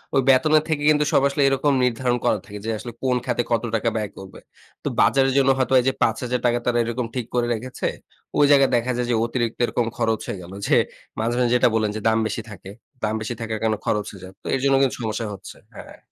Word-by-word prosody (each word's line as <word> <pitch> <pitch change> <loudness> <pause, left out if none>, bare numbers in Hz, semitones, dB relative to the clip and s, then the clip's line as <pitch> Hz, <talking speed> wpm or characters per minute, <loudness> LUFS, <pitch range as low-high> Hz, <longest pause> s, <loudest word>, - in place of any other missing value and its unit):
ওই 135 - +5
বেতনের 150 +4 +4
থেকে 150 -2 -1
কিন্তু 150 -1 +4
সব - - +5
আসলে 140 +1 -1
এরকম 135 +1 +2
নির্ধারণ 125 0 +1
করা - - +3
থাকে 105 0 -9
যে - - -2
আসলে 120 - -7
কোন 130 -1 +2
খাতে 120 -1 0
কত 115 0 +1
টাকা 115 +1 +1
ব্যয় 105 -2 -2
করবে। 95 -1 -11 0.4
তো - - -3
বাজারের 135 -1 +3
জন্য 135 -1 +4
হয়তো 130 0 0
এইযে 130 +2 0
৳৫,০০০ 120 +1 0
তারা 120 -1 +1
এরকম 120 +1 -3
ঠিক 125 -3 -2
করে 120 -1 +1
রেখেছে, 125 +3 -4 0.5
ওই 145 - +6
জায়গায় 140 -2 +5
দেখা 120 +2 0
যায় 125 -1 -1
যে 120 - +2
অতিরিক্ত 120 -1 -2
এরকম 120 0 -1
খরচ 110 -1 0
হয়ে 100 - -4
গেল। 90 +2 -11
যে - - +4 0.4
মাঝে, 115 +2 0
মাঝে 120 -1 +2
যেটা 125 - +4
বললেন 110 -2 +1
যে 110 - -4
দাম 110 0 +3
বেশি 110 +2 -4
থাকে, 95 -1 -10 0.3
দাম 105 0 0
বেশি 110 +3 -3
থাকার 110 -1 -3
কারণে 110 -1 +1
খরচ 105 -1 0
হয়ে 100 - -13
যায়। 95 0 -10
তো - - -8
এর - - -1
জন্য 135 -1 +4
কিন্তু 135 -2 +2
সমস্যা 110 0 -3
হচ্ছে। 95 - -11 0.2
হ্যাঁ। - - -11
120 Hz, 230 wpm, -22 LUFS, 110-130 Hz, 0.5 s, ওই